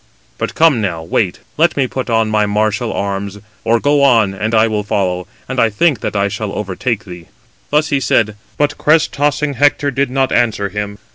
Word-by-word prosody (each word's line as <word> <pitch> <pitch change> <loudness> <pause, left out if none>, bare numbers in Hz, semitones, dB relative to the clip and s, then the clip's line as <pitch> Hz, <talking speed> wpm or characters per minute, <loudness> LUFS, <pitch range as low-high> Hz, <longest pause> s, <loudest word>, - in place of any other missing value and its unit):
But - - -3
come 160 -8 +4
now, 85 -6 -2
wait, 90 +3 -1 0.2
let 160 0 +2
me 135 - +2
put 130 0 -4
on 115 -1 +1
my 105 -1 +2
martial 110 +3 0
arms; 100 0 -3 0.3
or 115 +1 +2
go 145 +3 +2
on, 115 -8 +4
and 110 +3 -2
I 110 +1 +4
will 110 -1 -1
follow, 90 -3 -1 0.2
and 130 0 -3
I 115 - +4
think 135 +4 +1
that - - -4
I 100 0 +2
shall 100 +1 -4
overtake 105 +3 -3
thee." 90 -3 -10 0.4
Thus 150 +1 +2
he 140 - +1
said, 110 -4 +1 0.2
but 145 0 0
crest 160 +2 +3
tossing 145 0 0
Hector 145 +1 +2
did 135 0 0
not 135 +1 0
answer 110 -4 +1
him. 105 +1 -5
110 Hz, 200 wpm, -16 LUFS, 100-140 Hz, 0.4 s, come